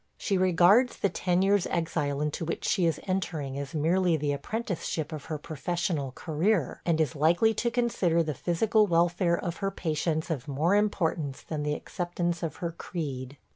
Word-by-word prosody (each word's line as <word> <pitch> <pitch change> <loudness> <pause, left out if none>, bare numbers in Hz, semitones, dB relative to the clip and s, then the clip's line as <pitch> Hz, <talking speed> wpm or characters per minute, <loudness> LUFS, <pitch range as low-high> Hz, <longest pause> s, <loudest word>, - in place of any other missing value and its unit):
She 200 - -1
regards 185 +7 +4
the 200 - +1
ten 180 0 +1
years' 200 -1 +3
exile 150 -4 -1
into 150 +2 -2
which 165 - -3
she 180 -5 +2
is 160 -3 0
entering 165 -8 -2
as 140 +2 -6
merely 170 +2 +2
the 145 -1 -1
apprenticeship 170 0 -3
of 155 -2 -6
her 155 - -3
professional 155 -1 -2
career, 165 - 0
and 165 -2 +2
is 155 -4 +1
likely 170 +9 +3
to 235 +3 0
consider 215 -9 +1
the 155 -1 -2
physical 210 - +2
welfare 170 0 +2
of 170 -1 -4
her 195 - -1
patients 160 -2 -2
of 145 -4 -3
more 150 +6 +1
importance 170 -9 0
than 155 -2 -4
the 150 0 0
acceptance 175 -1 -3
of 165 -3 -3
her 170 -1 -3
creed. 140 -6 -5
170 Hz, 175 wpm, -28 LUFS, 150-185 Hz, -, regards